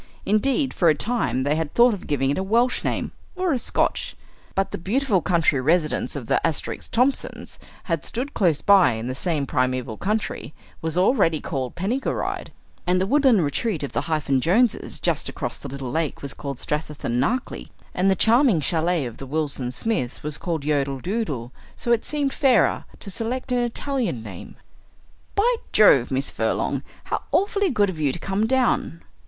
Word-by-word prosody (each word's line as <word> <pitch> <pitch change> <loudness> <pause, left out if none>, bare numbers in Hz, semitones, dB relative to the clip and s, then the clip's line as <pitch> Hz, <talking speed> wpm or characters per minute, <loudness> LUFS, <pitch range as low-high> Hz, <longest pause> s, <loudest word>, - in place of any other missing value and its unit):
Indeed, 265 +7 +1
for 170 - +3
a 155 - +4
time 220 - 0
they 145 +2 +1
had 160 -2 -3
thought 240 0 +6
of 200 - -7
giving 135 -2 +1
it - - -1
a - - -1
Welsh 235 +5 +2
name, - - -2 0.2
or 365 -3 0
a 255 - 0
Scotch. - - -1 0.4
But 195 0 0
the - - -4
beautiful 215 +1 +1
country 165 -6 +2
residence 155 +2 +1
of 135 -5 -5
the - - +1
Asterisk 165 -3 -2
Thomsons 255 +4 -1 0.2
had 165 -4 -2
stood 260 +4 -3
close 170 -8 +2
by 195 -10 +6
in 110 +1 -5
the 130 - -2
same 150 0 -1
primeval 130 -4 -1
country 210 -5 -3 0.3
was 160 +1 -2
already 180 - +3
called 130 -4 -4
Penny 215 +10 -1
gw - - -1
rydd, - - -3 0.4
and 180 +1 +3
the 190 - +1
woodland 260 - +4
retreat 155 +4 -1
of 140 - -4
the - - -1
Hyphen 150 -5 0
Joneses 215 - +2
just - - 0
across - - -4
the - - -7
little 135 -2 -5
lake 160 -3 -2
was 140 - -5
called 140 -2 -6
Strathythan 150 -5 -2
na 220 - +2
Clee, 255 - -10 0.2
and 185 +2 +2
the 190 - +4
charming 230 - +4
chalet 165 0 +1
of 120 -2 -7
the 135 - -8
Wilson 140 -4 -2
Smiths 135 - -2
was 150 0 -2
called 165 -5 -3
Yodel 140 -2 0
Dudel; 155 - -3 0.2
so 240 - -2
it 235 -1 +3
seemed 290 -2 0
fairer 260 -5 +3
to 200 - -5
select 245 +6 -3
an 250 - +2
Italian 240 - -1
name. 95 -5 -9 0.8
"By 465 +5 +3 0.2
Jove! 140 - +6
Miss 135 +1 -1
Furlong, - - -1 0.2
how - - -2
awfully 400 0 +2
good 205 - +2
of 165 - -9
you 145 -3 +2
to - - -5
come 195 +5 -1
down!" 250 -9 +1
175 Hz, 185 wpm, -23 LUFS, 140-235 Hz, 0.8 s, thought